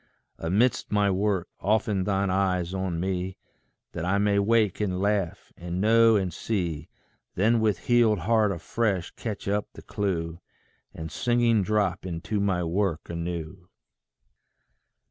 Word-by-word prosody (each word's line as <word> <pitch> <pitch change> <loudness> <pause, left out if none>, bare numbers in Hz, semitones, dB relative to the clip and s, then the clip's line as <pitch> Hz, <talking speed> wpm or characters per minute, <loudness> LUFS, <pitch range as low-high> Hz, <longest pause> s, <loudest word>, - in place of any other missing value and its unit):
Amidst 110 +9 +1
my 105 -1 +3
work, 95 -1 0
open 105 -2 +1
thine 100 -1 0
eyes 90 -2 0
on 95 -3 -2
me, 95 0 -2 0.5
That 85 - -5
I 95 +3 +1
may 100 0 +2
wake 105 -1 +2
and 95 -3 -1
laugh, 100 -3 -1
and 85 +1 -5
know 115 +2 +5
and 95 -4 0
see 85 -7 -3 0.5
Then 110 +5 +3
with 105 -5 0
healed 120 -3 +4
heart 110 +2 +3
afresh 95 +1 -1
catch 110 -4 -6
up 100 +1 0
the - - -12
clue, 85 -5 -2 0.5
And 80 0 -7
singing 120 -2 +2
drop 100 -2 0
into 90 +4 -3
my 95 -3 +1
work 85 -1 -1
anew. 85 +1 -5
95 Hz, 135 wpm, -26 LUFS, 90-105 Hz, 0.5 s, know